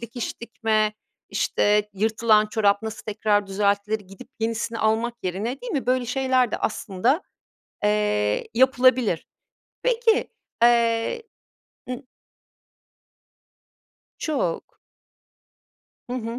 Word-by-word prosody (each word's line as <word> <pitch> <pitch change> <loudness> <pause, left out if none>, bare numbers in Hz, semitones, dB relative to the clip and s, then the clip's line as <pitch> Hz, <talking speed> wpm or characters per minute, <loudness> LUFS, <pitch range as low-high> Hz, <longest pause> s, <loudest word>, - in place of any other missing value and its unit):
dikiş 235 0 -6
dikme, 220 -2 0 0.4
işte, 210 0 +1
yırtılan 215 +1 +3
çorap 205 -1 +2
nasıl 220 -1 -6
tekrar 210 -1 +1
düzeltilir, 205 +2 0
gidip 195 -1 -13
yenisini 230 0 -2
almak 220 +2 +1
yerine, 200 +8 -3
değil - - -5
mi, 275 -5 -2
böyle 255 -1 +1
şeyler 255 -1 +2
de - - -1
aslında, 225 - 0 0.6
eee, 105 - +1
yapılabilir. 255 -6 +3 0.6
Peki 470 -2 +2 0.3
eee 235 - +3 0.7
I 250 +2 -5 2.2
Çok. 270 - -2 1.3
Hı - - -2
hı. 230 0 -4
225 Hz, 95 wpm, -24 LUFS, 210-250 Hz, 2.2 s, yırtılan